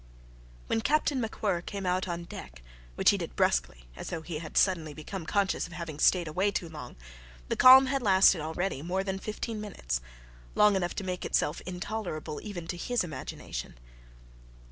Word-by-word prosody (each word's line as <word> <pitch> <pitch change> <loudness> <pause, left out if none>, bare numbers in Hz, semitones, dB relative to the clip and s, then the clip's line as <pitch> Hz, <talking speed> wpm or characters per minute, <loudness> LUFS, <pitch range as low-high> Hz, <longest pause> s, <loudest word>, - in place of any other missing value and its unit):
When 225 - 0
Captain 290 0 +2
MacWhirr 210 -5 -1
came 200 -1 -4
out 185 +1 0
on 170 -1 -3
deck, 65 - -10 0.3
which - - +5
he - - -1
did - - -6
brusquely, - - 0
as - - -7
though 165 -2 -4
he 160 -2 -5
had 160 -1 -6
suddenly 165 -6 +2
become 160 +3 -7
conscious 200 -4 +1
of 170 - -13
having 165 -4 -6
stayed 175 0 +4
away 185 +6 +1
too 185 -3 -2
long, 150 -6 -9 0.5
the - - +1
calm 260 +1 +9
had 270 +1 0
lasted 190 -5 +5
already 160 0 -2
more 180 +4 -1
than 190 -1 -3
fifteen 215 +1 -4
minutes 65 - -3 0.5
long 210 -1 +5
enough 175 -2 -1
to 205 - -3
make 180 -1 -3
itself 150 - 0
intolerable 180 -4 -4
even 190 -6 -6
to 175 - -3
his 245 +5 0
imagination. 160 - -6
180 Hz, 175 wpm, -29 LUFS, 160-205 Hz, 0.5 s, calm